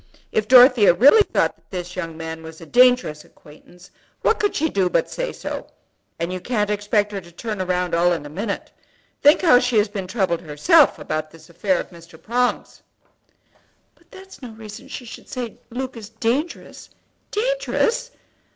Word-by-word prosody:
If 215 -1 0
Dorothea 245 -6 +7
really 285 - +7
thought - - 0
that - - -36
this 180 -1 -6
young 165 -3 -5
man 160 0 -6
was 160 0 -11
a 165 - -11
dangerous 245 -10 +3
acquaintance 175 +5 -18 0.3
what 450 - +2
could 410 - 0
she 320 - +1
do 195 - 0
but - - 0
say - - -3
so? - - -7 0.5
And 170 +2 -3
you 185 - -4
can't 210 0 -1
expect 205 0 0
her 200 -1 -5
to 170 -1 -16
turn 210 +4 -6
round 180 -1 -1
all 175 +1 +3
in 165 -4 -2
a - - -6
minute. 200 +6 -5 0.5
Think 290 +5 +5
how 310 -8 +6
she 245 -2 0
has 210 0 +3
been 195 -3 -5
troubled 185 -4 -1
herself 265 - +4
about 155 0 -4
this 160 +1 -17
affair 185 +2 0
of - - -7
Mr. 170 0 -15
Prong's." 245 +2 -2 1.1
"But - - -30
that's 385 -3 -14
no 250 - -8
reason 215 -1 -11
she 250 - -8
should 225 - -11
say 245 -2 -4
that - - -23
Luke 255 +2 -5
is 215 -3 -9
dangerous. 235 +9 -3 0.4
Dangerous! - - -1
210 Hz, 180 wpm, -21 LUFS, 175-250 Hz, 1.1 s, Dorothea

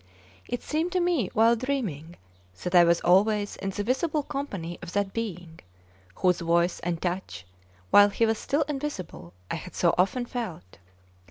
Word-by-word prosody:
It 245 - -4
seemed 320 +4 -1
to 365 - +2
me 345 - +1
while 230 +2 +5
dreaming 215 - -3 0.5
that 180 - -3
I 175 -1 +8
was 170 0 +3
always 205 +3 +3
in 195 - -3
the 205 +1 -3
visible 290 +6 0
company 200 - -5
of 175 0 -8
that 200 -1 -1
being 180 -7 -5 0.6
whose 180 -2 +2
voice 170 +1 +1
and 170 -1 -2
touch, 175 - -4 0.5
while 205 0 +8
he 230 +3 +1
was 225 -1 0
still 290 +2 0
invisible, 270 - -6 0.2
I - - -1
had 180 +3 -10
so 170 -2 +3
often 240 +7 +2
felt. 185 - -6
200 Hz, 165 wpm, -27 LUFS, 175-255 Hz, 0.6 s, I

